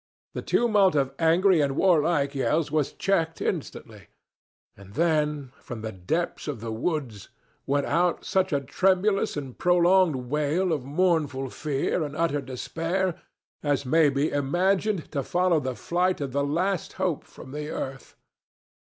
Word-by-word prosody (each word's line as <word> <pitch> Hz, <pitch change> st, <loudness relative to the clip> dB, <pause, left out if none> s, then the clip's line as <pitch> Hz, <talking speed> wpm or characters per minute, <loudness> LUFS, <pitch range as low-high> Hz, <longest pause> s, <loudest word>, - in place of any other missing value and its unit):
The -, -, -4 dB
tumult 205 Hz, -7 st, +3 dB
of 135 Hz, -2 st, +1 dB
angry 170 Hz, +1 st, +4 dB
and 140 Hz, -2 st, 0 dB
warlike 155 Hz, -5 st, +2 dB
yells 150 Hz, +3 st, 0 dB
was 150 Hz, -3 st, +1 dB
checked 165 Hz, -4 st, 0 dB
instantly, -, -, -5 dB, 0.7 s
and 100 Hz, +1 st, -15 dB
then 150 Hz, -4 st, 0 dB
from 120 Hz, -3 st, -7 dB
the 110 Hz, 0 st, -4 dB
depths 155 Hz, -, -3 dB
of 145 Hz, -6 st, -4 dB
the 115 Hz, +1 st, -5 dB
woods 120 Hz, -, -3 dB, 0.4 s
went 140 Hz, 0 st, +1 dB
out 175 Hz, 0 st, +1 dB
such 190 Hz, -1 st, +1 dB
a 140 Hz, -2 st, +1 dB
tremulous 190 Hz, +7 st, +1 dB
and 135 Hz, -4 st, -6 dB
prolonged 175 Hz, -1 st, +4 dB
wail 150 Hz, +7 st, 0 dB
of 145 Hz, -5 st, -2 dB
mournful 145 Hz, -4 st, 0 dB
fear 150 Hz, +3 st, -1 dB
and 150 Hz, -1 st, -4 dB
utter 160 Hz, -3 st, +1 dB
despair 165 Hz, +8 st, -2 dB, 0.5 s
as 145 Hz, -2 st, 0 dB
may 155 Hz, +3 st, +4 dB
be 140 Hz, +2 st, 0 dB
imagined 180 Hz, +6 st, 0 dB
to 140 Hz, -, -1 dB
follow 175 Hz, +3 st, +2 dB
the 130 Hz, -3 st, -3 dB
flight 180 Hz, +5 st, 0 dB
of 140 Hz, -2 st, -3 dB
the 140 Hz, +2 st, 0 dB
last 175 Hz, +6 st, -1 dB
hope -, -, -1 dB
from 130 Hz, -, -13 dB
the 150 Hz, +1 st, -5 dB
earth. 135 Hz, -3 st, -6 dB
150 Hz, 150 wpm, -26 LUFS, 140-180 Hz, 0.7 s, angry